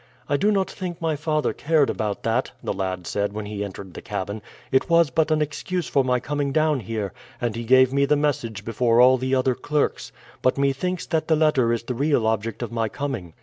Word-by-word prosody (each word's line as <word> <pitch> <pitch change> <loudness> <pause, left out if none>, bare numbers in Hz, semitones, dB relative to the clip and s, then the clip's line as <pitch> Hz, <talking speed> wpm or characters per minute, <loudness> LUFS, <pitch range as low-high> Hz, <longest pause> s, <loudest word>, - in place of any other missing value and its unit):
"I 145 - +1
do 205 +9 +2
not 195 -2 +1
think 180 -3 -6
my 160 -2 0
father 155 0 0
cared 155 -2 +2
about 105 -2 -3
that," 115 +3 0
the - - -1
lad 95 -2 -3
said 100 +2 -1
when 105 0 -5
he 105 0 -4
entered 95 -2 -8
the - - -8
cabin; 100 +1 -4 0.3
"it 130 - +2
was 170 -3 +4
but 160 +4 +2
an 155 -1 +2
excuse 170 +4 -3
for 135 - +2
my 125 -1 +1
coming 145 +2 -2
down 155 -1 +2
here, 110 -3 -4 0.3
and 120 -3 -2
he 115 - -4
gave 130 +2 +5
me 140 0 +3
the 150 +2 +3
message 120 -8 -1
before 115 +1 +2
all 130 +1 +6
the 130 +1 0
other 130 0 +2
clerks. 145 +4 -1 0.3
But 130 - +2
methinks 140 +6 0
that 160 -1 -1
the 160 - +4
letter 150 -7 +3
is 115 -1 -1
the 125 - -3
real 140 -2 +1
object 110 +1 -1
of 120 - -5
my 115 -2 -1
coming." 100 - -5
130 Hz, 225 wpm, -23 LUFS, 110-150 Hz, 0.3 s, all